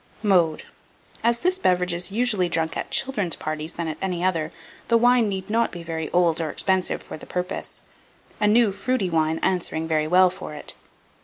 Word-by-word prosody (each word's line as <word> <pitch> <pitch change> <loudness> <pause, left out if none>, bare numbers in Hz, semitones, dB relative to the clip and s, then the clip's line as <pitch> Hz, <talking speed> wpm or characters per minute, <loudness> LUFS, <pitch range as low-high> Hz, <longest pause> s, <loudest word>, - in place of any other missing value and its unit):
Mode. 175 -6 +3 0.6
As 235 0 +2
this 365 +2 +2
beverage 180 - +2
is 175 +1 -2
more 200 - -6
usually 215 -8 +2
drunk 160 -1 0
at - - -4
children's 250 -10 0
parties 155 +1 -4
than 170 -1 -4
at 155 - -5
any 180 -2 -2
other, 165 -4 0 0.4
the 230 - +4
wine 240 -1 +4
need 190 -1 -4
not 230 +2 +1
be 175 -2 -8
very 160 -1 -4
old 170 -2 +2
or 160 - -2
expensive 190 +4 0
for - - -8
the - - -12
purpose, 180 0 -4 0.6
a 210 - +3
new 220 0 +4
fruity 200 -1 -1
wine 160 0 +1
answering 170 -3 0
very 155 -1 +1
well 180 +2 +5
for 180 -4 -8
it. 150 - -5
180 Hz, 190 wpm, -24 LUFS, 165-210 Hz, 0.6 s, well